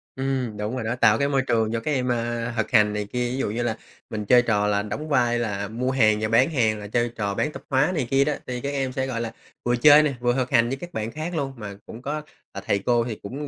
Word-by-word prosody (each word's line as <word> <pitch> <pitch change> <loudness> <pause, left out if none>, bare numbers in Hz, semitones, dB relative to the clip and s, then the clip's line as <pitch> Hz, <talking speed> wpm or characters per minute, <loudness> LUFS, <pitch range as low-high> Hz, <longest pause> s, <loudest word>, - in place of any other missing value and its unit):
Ừm, 130 -5 -2
đúng 105 +4 -3
rồi 125 - -3
đó. 110 +2 -1
Tạo 115 -3 +4
cái 140 - +2
môi 135 -1 +2
trường 115 -4 0
cho 115 - -1
các 135 +7 -3
em, 130 -3 0
ơ, 120 -1 -1
thực 110 - -1
hành 105 -3 +4
này 105 0 -2
kia, 125 -1 0
ví 130 - -3
dụ 135 - -1
như 115 +3 -2
là 115 -2 -1 0.3
mình 105 -1 -4
chơi 125 +3 +6
trò 105 -4 +1
là 100 -1 +1
đóng 110 +10 -5
vai 120 -4 +2
là 100 -3 -2
mua 120 +5 -2
hàng 110 -5 +3
và 110 - +1
bán 115 +6 +4
hàng, 110 -8 +1
là 105 - -7
chơi 120 +2 0
trò 100 -2 -2
bán 150 - 0
tạp - - -10
hóa 135 +5 +2
này 140 -7 -1
kia 135 0 +4
đó, 150 - +1
thì 125 -1 -4
các 140 - -3
em 135 -2 -2
sẽ, 130 +1 -2
gọi 120 -3 -3
là, 115 -1 -3 0.3
vừa 120 0 +1
chơi 145 +5 +7
nè, 150 -2 0
vừa 120 0 +1
thực 130 -1 -1
hành 120 -3 +4
với 135 - -2
các 175 +5 -9
bạn 110 -2 -3
khác 160 +5 -5
luôn. 140 -3 -2
Mà 105 -3 -7
cũng 115 - -10
có, 145 +4 -3 0.3
ờ, - - -7
thầy 100 - +1
cô 120 -1 +3
thì 115 -3 -4
cũng 140 +8 -6
120 Hz, 295 wpm, -24 LUFS, 110-135 Hz, 0.3 s, chơi